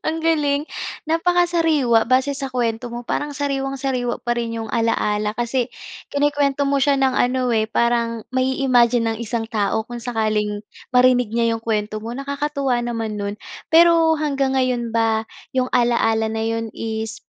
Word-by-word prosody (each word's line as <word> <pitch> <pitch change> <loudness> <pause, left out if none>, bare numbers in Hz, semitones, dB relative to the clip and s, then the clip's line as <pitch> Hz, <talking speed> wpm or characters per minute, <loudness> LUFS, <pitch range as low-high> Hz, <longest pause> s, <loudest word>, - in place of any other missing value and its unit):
Ang 325 - -3
galing, 295 -2 +1 0.4
napakasariwa 325 -7 +2
base 260 +3 +1
sa 270 -1 -5
kuwento 240 -1 -2
mo 240 0 -7
parang 295 0 -2
sariwang-sariwa 270 -3 -2
pa 240 - +2
rin 230 -1 -3
'yong 225 - -4
ala-ala 210 -2 +1
kasi 240 +1 -1 0.4
kinukuwento 285 -1 +1
mo 275 -1 +1
siya 280 0 +3
ng 265 -1 +2
ano 255 +1 +1
eh, 220 0 0
parang 235 -1 0
mai-imagine 250 -3 +2
ang 220 - -8
isang 225 0 -3
tao 220 0 -1
kung 240 -1 -7
sakaling 215 -3 -1 0.2
marinig 250 -2 +4
niya 230 0 +1
'yong 225 - -6
kuwento 215 -1 -2
mo. 230 - -5
Nakakatuwa 275 -1 -2
naman 230 -2 -3
no'n 205 0 -4 0.3
pero 330 -1 +5
hanggang 275 -3 0
ngayon 245 -3 0
ba 225 -1 +1 0.3
'yong 255 -1 0
alaala 235 -2 +2
na 220 0 -2
'yon 225 0 -1
is 220 0 -5
245 Hz, 150 wpm, -21 LUFS, 225-275 Hz, 0.4 s, pero